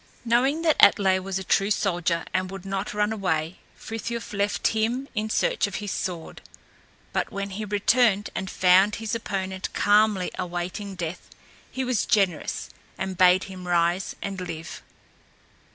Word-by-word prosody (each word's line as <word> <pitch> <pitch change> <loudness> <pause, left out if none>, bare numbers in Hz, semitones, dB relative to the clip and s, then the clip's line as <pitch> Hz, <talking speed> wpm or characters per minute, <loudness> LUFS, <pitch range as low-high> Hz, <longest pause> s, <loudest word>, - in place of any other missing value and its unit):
Knowing 265 +7 +2
that 315 -2 +3
Atlé 190 -2 +5
was 190 0 -3
a 190 - -4
true 195 +2 +2
soldier 175 -4 0
and 185 0 0
would 195 0 -8
not 195 +1 -3
run 210 +1 +1
away, 170 -5 -2 0.2
Frithiof 230 0 -5
left 200 0 +1
him 230 +5 -1
in 215 -2 -2
search - - +1
of 200 - -7
his 205 +2 -4
sword; 175 -3 -4 0.7
but - - -1
when 200 0 -4
he 215 +3 -4
returned 210 +1 +2
and 190 0 -4
found 190 +4 +4
his 225 -2 -4
opponent 190 -4 -3
calmly 205 -2 +3
awaiting 180 +3 -4
death, 175 -1 -5 0.4
he 260 - -3
was 250 -4 0
generous, 190 -7 0 0.3
and 190 -1 -3
bade 180 +1 +5
him 185 -2 -9
rise 175 +1 +1
and 195 -2 -4
live. 165 -2 -7
195 Hz, 150 wpm, -25 LUFS, 185-215 Hz, 0.7 s, Atlé